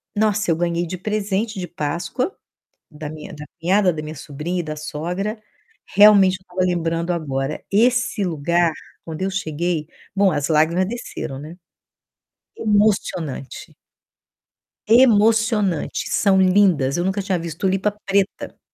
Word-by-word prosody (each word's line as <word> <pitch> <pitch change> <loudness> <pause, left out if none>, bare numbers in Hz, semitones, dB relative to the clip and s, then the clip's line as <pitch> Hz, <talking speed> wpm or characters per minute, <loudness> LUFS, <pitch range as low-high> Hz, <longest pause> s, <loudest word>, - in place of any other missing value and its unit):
nossa, 215 -2 +1
eu 165 - +3
ganhei 170 0 -1
de 185 +2 -5
presente 210 +1 -2
de 180 - -4
Páscoa, 170 - -3 0.6
da 150 -1 -7
minha 155 0 -9
da 150 0 -9
cunhada, 185 +2 +3
da 155 - -5
minha 155 +1 -7
sobrinha 155 +5 -4
e - - -1
da 155 -1 -6
sogra. 180 +9 -4 0.5
Realmente 200 -2 +7
eu - - -27
estava 185 0 -6
lembrando 170 -1 -1
agora, 140 -3 -3
esse 245 0 +2
lugar, 170 0 +1 0.3
quando 165 +2 -6
eu 195 - 0
cheguei, 165 -3 -2 0.3
bom, 195 -1 +4
as 145 -1 -1
lágrimas 165 +4 +2
desceram, 200 - -6
né, 155 +4 -9 1.0
emocionante. 200 - -1 1.1
Emocionante. 220 - +3
São 190 -2 +3
lindas, 180 -7 +3
eu 175 - 0
nunca 195 +1 0
tinha 190 -2 -1
visto 165 -1 -6
tulipa 195 +2 +1
preta. 195 0 -1
180 Hz, 135 wpm, -21 LUFS, 160-205 Hz, 1.1 s, Realmente